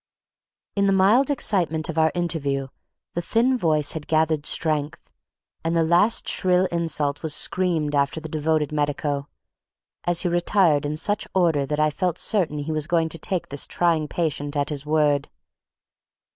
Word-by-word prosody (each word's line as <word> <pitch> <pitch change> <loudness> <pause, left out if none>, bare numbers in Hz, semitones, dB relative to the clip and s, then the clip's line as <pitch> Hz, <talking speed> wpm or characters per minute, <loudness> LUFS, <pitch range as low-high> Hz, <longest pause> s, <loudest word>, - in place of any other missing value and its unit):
In 200 -1 +2
the 195 - +3
mild 210 +9 +4
excitement 170 - 0
of 165 - -5
our 160 0 +3
interview 140 -6 -1 0.4
the 175 - -2
thin 235 +8 +2
voice 155 - +1
had 155 -2 -6
gathered 155 -1 +1
strength, 155 -2 -2 0.5
and 165 +1 -1
the 165 - +3
last 175 +7 +3
shrill 185 -1 +2
insult 155 -4 -1
was 160 -3 0
screamed 170 -6 0
after 140 +2 +1
the 160 - -7
devoted 155 -1 0
medico, 145 -1 -2 0.8
as 175 -1 +2
he 180 - 0
retired 175 -4 +2
in 150 +1 -3
such 205 +6 0
order 160 -7 +2
that 150 +1 -2
I 155 0 +3
felt 180 +3 -1
certain 180 -9 0
he 145 +2 -4
was 155 -1 -1
going 165 -2 +1
to 165 - -5
take 180 +3 -3
this 140 0 0
trying 165 -3 +1
patient 145 -3 -2
at 145 +1 0
his 145 -1 -5
word. 150 -2 +2
160 Hz, 165 wpm, -23 LUFS, 150-175 Hz, 0.8 s, mild